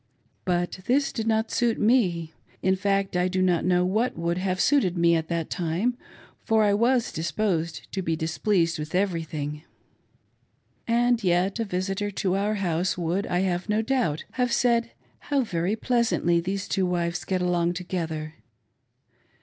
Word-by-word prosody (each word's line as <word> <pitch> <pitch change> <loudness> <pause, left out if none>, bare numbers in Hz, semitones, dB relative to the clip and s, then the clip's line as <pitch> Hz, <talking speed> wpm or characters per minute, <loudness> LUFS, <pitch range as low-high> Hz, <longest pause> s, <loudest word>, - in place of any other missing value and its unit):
But 175 0 -1
this 275 +3 +2
did 225 -1 -3
not 220 0 +1
suit 235 -2 +1
me. 180 -9 +2 0.3
In 190 0 +3
fact 195 0 0
I 180 +1 +2
do 185 0 -1
not 180 -3 +2
know 180 0 +2
what 215 +5 0
would 170 +1 -1
have 185 0 -1
suited 190 -12 +2
me 170 0 +4
at 160 -1 -1
that 165 -1 -3
time, 180 +9 0 0.5
for 220 -1 +3
I 205 -1 +3
was 235 +3 +2
dis 165 +1 -3
posed 170 -6 -1
to 195 - -2
be 165 -2 -1
displeased 165 +1 0
with 150 +2 -5
everything. 160 -6 -2 1.3
And 240 0 +2
yet 185 +4 +1
a 225 - 0
visitor 195 +2 -2
to 190 -2 -1
our 205 +2 0
house 180 -2 0
would, 180 +3 -1
I 180 0 0
have 180 +1 -1
no 215 +1 +2
doubt, 225 - 0
have 250 -1 0
said, 235 -1 +2 0.3
How 285 -2 0
very 185 -3 -1
pleas 235 0 +1
antly 170 0 +1
those 195 +2 -3
two 190 -2 0
wives 175 -1 -1
get 185 -1 -1
along 175 -1 +1
together. 165 -4 -4
185 Hz, 165 wpm, -26 LUFS, 170-215 Hz, 1.3 s, me